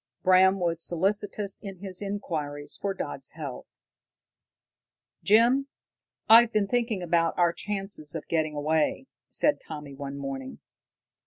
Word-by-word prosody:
Bram 190 Hz, +1 st, +5 dB
was 170 Hz, -2 st, 0 dB
solicitous 200 Hz, +3 st, 0 dB
in 195 Hz, -3 st, -8 dB
his 190 Hz, 0 st, -6 dB
inquiries 155 Hz, -8 st, -4 dB
for 200 Hz, -1 st, -3 dB
Dodd's 135 Hz, -2 st, -5 dB
health. 145 Hz, -5 st, -7 dB, 1.5 s
"Jim, 240 Hz, +6 st, +4 dB, 0.6 s
I've 230 Hz, +1 st, +8 dB
been 215 Hz, -2 st, +2 dB
thinking 230 Hz, -4 st, -1 dB
about 170 Hz, -1 st, +1 dB
our 175 Hz, -1 st, +3 dB
chances 195 Hz, -7 st, -5 dB
of -, -, -6 dB
getting 155 Hz, -2 st, 0 dB
away," 155 Hz, -, 0 dB, 0.2 s
said 295 Hz, -1 st, +2 dB
Tommy 150 Hz, -3 st, -8 dB
one 140 Hz, 0 st, -6 dB
morning. 135 Hz, -1 st, -6 dB
180 Hz, 120 wpm, -27 LUFS, 150-205 Hz, 1.5 s, I've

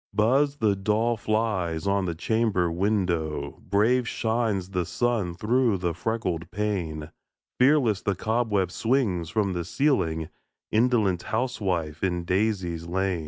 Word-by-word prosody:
Buzz 135 Hz, +7 st, +3 dB
the 110 Hz, -7 st, +2 dB
dull 110 Hz, +4 st, +1 dB
flies 105 Hz, -7 st, -1 dB
on 100 Hz, -1 st, +1 dB
the 85 Hz, -2 st, -2 dB
chamber 100 Hz, -2 st, +1 dB
window; 85 Hz, -7 st, -1 dB
Brave 115 Hz, +5 st, +3 dB
shines 110 Hz, -6 st, -1 dB
the 90 Hz, -2 st, 0 dB
sun 105 Hz, -2 st, -1 dB
through 115 Hz, +2 st, +2 dB
the 90 Hz, -2 st, -1 dB
freckled 90 Hz, -3 st, -2 dB
pane; 90 Hz, -7 st, -3 dB, 0.5 s
Fearless 125 Hz, -6 st, +4 dB
the 100 Hz, -, -1 dB
cobweb 105 Hz, -3 st, 0 dB
swings 110 Hz, -8 st, 0 dB
from 100 Hz, +1 st, 0 dB
the 85 Hz, -1 st, -2 dB
ceiling 85 Hz, -, 0 dB, 0.4 s
Indolent 110 Hz, -6 st, +2 dB
housewife, 95 Hz, -, -2 dB
in 90 Hz, -2 st, 0 dB
daisies 90 Hz, -3 st, -1 dB
lain! 95 Hz, 0 st, 0 dB
100 Hz, 125 wpm, -26 LUFS, 85-115 Hz, 0.5 s, Fearless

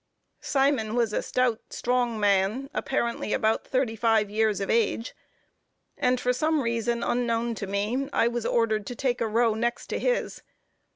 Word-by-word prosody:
Simon 270 Hz, -6 st, +1 dB
was 230 Hz, -3 st, +1 dB
a -, -, 0 dB
stout, 250 Hz, -3 st, 0 dB
strong 245 Hz, -2 st, -1 dB
man, 205 Hz, +7 st, +1 dB
apparently 235 Hz, -4 st, -1 dB
about 220 Hz, +1 st, +1 dB
thirty 255 Hz, -4 st, 0 dB
five 220 Hz, -2 st, +2 dB
years 215 Hz, -1 st, +1 dB
of 195 Hz, -, -2 dB
age; 230 Hz, +1 st, 0 dB, 0.8 s
and 250 Hz, 0 st, +1 dB
for 250 Hz, 0 st, +1 dB
some 310 Hz, +3 st, +1 dB
reason 235 Hz, 0 st, -1 dB
unknown 235 Hz, -1 st, 0 dB
to 210 Hz, -3 st, -5 dB
me, 215 Hz, +8 st, -1 dB
I 230 Hz, -, +2 dB
was 240 Hz, -1 st, -2 dB
ordered 220 Hz, -3 st, +1 dB
to 245 Hz, -, -5 dB
take 250 Hz, -1 st, -1 dB
a 230 Hz, -, +1 dB
row 225 Hz, +1 st, +2 dB
next 235 Hz, +2 st, -2 dB
to -, -, -1 dB
his. -, -, -1 dB
235 Hz, 165 wpm, -26 LUFS, 220-250 Hz, 0.8 s, five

